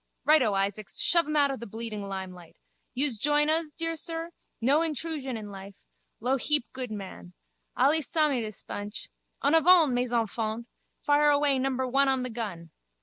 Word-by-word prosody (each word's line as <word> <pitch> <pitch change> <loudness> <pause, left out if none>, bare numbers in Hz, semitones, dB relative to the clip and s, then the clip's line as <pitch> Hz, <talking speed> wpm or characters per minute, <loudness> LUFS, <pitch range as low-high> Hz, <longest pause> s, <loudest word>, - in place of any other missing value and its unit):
Righto, 300 -9 +4
Isaacs, 200 +1 -2
shove 340 -3 +3
em 305 - -2
out 285 -2 +4
of 270 - -5
the 235 - -7
bleeding 220 0 -6
limelight. 185 -3 -7 0.4
Yous 265 -3 +2
join 295 +5 +2
uz, 320 -1 +1
dear 330 +1 -3
sir? 330 +1 -5 0.3
No 265 +6 +3
hentrusion 305 -5 -3
in 210 -2 -8
life. 195 0 -10 0.4
Lou 255 +4 +1
heap 295 0 +1
good 260 -2 -5
man. 190 - -8 0.4
Allee 315 +3 +4
samee 300 -4 +1
dis 215 -2 -7
bunch. 205 +2 -7 0.3
En 285 +2 +3
avant, 325 -3 +6
mes 245 0 -1
enfants! 225 0 -2 0.4
Fire 295 0 +4
away 285 -2 +3
number 260 0 -1
one 275 +2 +3
on 265 -1 +1
the 255 - -4
gun. 195 -8 -6
260 Hz, 170 wpm, -28 LUFS, 215-295 Hz, 0.4 s, avant